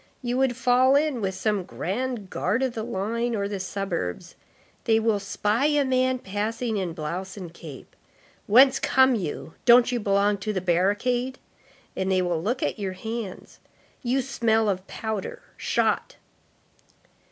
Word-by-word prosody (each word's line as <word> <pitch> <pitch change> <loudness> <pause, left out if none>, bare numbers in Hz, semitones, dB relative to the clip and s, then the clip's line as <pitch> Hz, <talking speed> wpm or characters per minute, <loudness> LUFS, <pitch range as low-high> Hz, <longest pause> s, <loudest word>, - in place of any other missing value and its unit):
You 245 0 -1
would 260 -3 +1
fall 255 +2 +4
in 285 -4 +1
with 190 -1 -2
some 210 +1 0
grand 210 +3 -4
guard 220 +9 0
of 260 -2 -1
the 225 - -4
line 230 +2 -2
or 200 -1 -1
the 200 -1 -4
suburbs; 185 - -4 0.5
they 225 -1 +4
will 220 -2 +1
spy 210 +6 0
a 295 -2 +2
man 255 0 +2
passing 220 +2 -3
in 180 -4 -2
blouse 175 +5 -5
and 175 -4 -8
cap. 155 -6 -10 0.6
'Whence 260 +5 +6
come 260 0 +4
you?' 170 -6 -4
'Don't 245 0 +7
you 245 - 0
belong 200 0 +2
to 215 +2 -3
the 190 - 0
barricade?' 205 +9 0 0.6
And 190 0 -1
they 185 -1 +2
will 175 -2 -1
look 245 +8 -1
at - - -2
your 195 -2 -3
hands. 220 0 -6 0.4
You 260 +1 0
smell 225 -4 +1
of 190 -1 -2
powder. 220 -3 -5
Shot." - - 0
215 Hz, 155 wpm, -25 LUFS, 190-245 Hz, 0.6 s, Don't